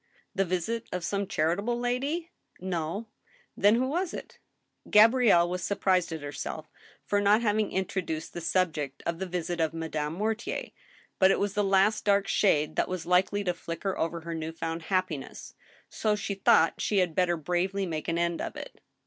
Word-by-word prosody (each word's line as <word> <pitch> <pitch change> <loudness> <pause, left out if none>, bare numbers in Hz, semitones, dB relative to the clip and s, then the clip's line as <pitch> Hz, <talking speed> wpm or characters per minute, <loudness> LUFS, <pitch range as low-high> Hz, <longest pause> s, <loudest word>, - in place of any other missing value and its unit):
" - - -31
The 195 - +1
visit 185 +6 -2
of 180 -1 -3
some 200 +1 -1
charitable 200 +11 0
lady? 280 +8 -2
" - - -50
" - - -26
No." 180 +3 -3 0.3
" - - -33
Then, 205 +3 +5
who 255 +2 +1
was 340 +5 -2
it? - - -9 0.2
" - - -51
Gabrielle 220 -5 +6
was 180 +1 -3
surprised 185 -3 +1
at 160 -2 -5
herself 150 +2 -6 0.3
for 205 0 +1
having 210 0 +3
introduced 180 -4 -3
the 175 - -5
sub, 180 0 +1
ject 140 -3 -5
of 170 0 -2
the 190 - -3
visit 175 -1 -3
of 160 0 0
Madame 155 -2 -3
Mortier, 220 - -2 0.5
but 190 - +6
it - - +3
was 200 -1 -1
the 210 - +1
last 195 +2 +3
dark 200 -1 +3
shade 155 -7 +2
that - - +1
was 185 -2 -4
likely 185 +3 +2
to 180 -2 0
flicker 175 +3 -4
over 165 0 -2
her 165 +1 -5
new 160 0 -4
found 165 0 -4
happiness, 185 -7 -2 0.3
so 215 -1 0
she 205 -1 -3
thought 185 -4 +3
she 210 - 0
had 180 -3 +2
better 175 0 +2
bravely 180 +5 -1
make 160 -3 -4
an 165 - 0
end 170 0 0
of - - -5
it. - - -9
185 Hz, 195 wpm, -28 LUFS, 165-205 Hz, 0.5 s, Gabrielle